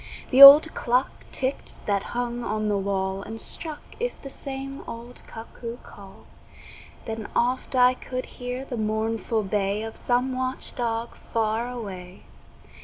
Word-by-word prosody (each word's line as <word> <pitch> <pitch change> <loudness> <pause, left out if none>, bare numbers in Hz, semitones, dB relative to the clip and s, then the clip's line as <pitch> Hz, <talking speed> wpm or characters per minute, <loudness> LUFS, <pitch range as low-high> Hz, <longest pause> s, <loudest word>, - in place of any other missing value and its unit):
The 265 +1 +5
old 290 +3 +12
clock 250 +2 +1 0.2
ticked 265 +1 -2
that 200 -1 +1 0.2
hung 240 0 -2
on 215 -1 -1
the 205 - +1
wall 190 0 -2
And 225 +2 -7
struck 310 +4 -6 0.2
'th - - -3
the 275 - -7
same 275 0 -6
old 235 +1 -7
cuckoo 230 +1 -8
call; 195 -1 -14 0.8
Then 220 -1 -5
oft 250 +2 0
I 250 0 +6
could 255 0 -5 0.2
hear 250 +2 -4
the 245 - -5
mournful 220 +1 -1
bay 200 +1 -1
Of 225 0 -6
some 250 +1 0
watch 255 0 -4
dog 230 -1 -2
far 225 +1 -2
away. 190 -7 -8
235 Hz, 145 wpm, -25 LUFS, 215-255 Hz, 0.8 s, old